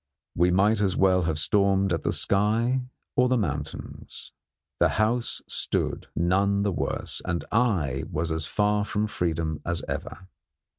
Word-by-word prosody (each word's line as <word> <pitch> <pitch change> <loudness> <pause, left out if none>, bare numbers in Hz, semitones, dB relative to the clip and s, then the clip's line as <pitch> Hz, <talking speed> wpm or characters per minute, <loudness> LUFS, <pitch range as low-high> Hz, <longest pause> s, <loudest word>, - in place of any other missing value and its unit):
We 90 +1 +3
might 100 +4 +3
as 95 -3 +1
well 95 -1 +4
have 80 - -1
stormed 100 +2 +3
at 80 - -1
the - - 0
sky 110 +6 +2 0.3
or 125 0 +3
the 130 - +3
mountains. 75 - -5 0.5
The - - +4
house 115 +3 0
stood, - - -2
none 100 +3 +2
the 100 - +1
worse, - - -2
and 85 -2 -2
I 90 - +1
was 80 +2 -2
as 80 0 -2
far 105 +1 +1
from 105 +1 -1
freedom 80 -6 -2
as 85 0 -1
ever. 95 - -6
95 Hz, 150 wpm, -26 LUFS, 85-105 Hz, 0.5 s, well